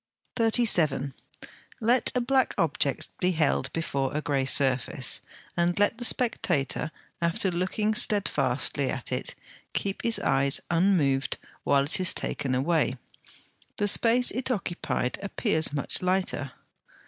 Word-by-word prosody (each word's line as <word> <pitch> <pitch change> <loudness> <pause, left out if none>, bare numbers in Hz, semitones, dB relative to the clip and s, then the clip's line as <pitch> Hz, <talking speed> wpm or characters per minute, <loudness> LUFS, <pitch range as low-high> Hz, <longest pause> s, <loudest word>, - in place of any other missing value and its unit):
37. 220 - +2 0.7
Let 240 +2 +2
a 250 - +1
black 260 +1 +1
object 145 -3 0
be 180 0 +1
held 155 -3 0
before 140 -5 -2
a - - 0
grey 140 -3 -1
surface, 130 -2 +3 0.3
and 175 0 0
let 205 +3 +1
the 245 - +2
spectator, 225 - +1 0.3
after 170 +3 0
looking 190 +5 -1
steadfastly 210 -1 +1
at - - -4
it, - - -2 0.4
keep 195 -1 -3
his 230 -1 +2
eyes 135 +1 +1
unmoved 165 -7 +1 0.3
while 140 -1 +2
it 145 - -3
is 185 -2 +4
taken 130 -2 -3
away: 140 -1 0 0.8
the 205 - 0
space 235 +4 +4
it 255 +1 -2
occupied 175 - -3
appears 200 - 0
much 145 -1 +1
lighter. 180 -7 -1
175 Hz, 125 wpm, -26 LUFS, 140-215 Hz, 0.8 s, is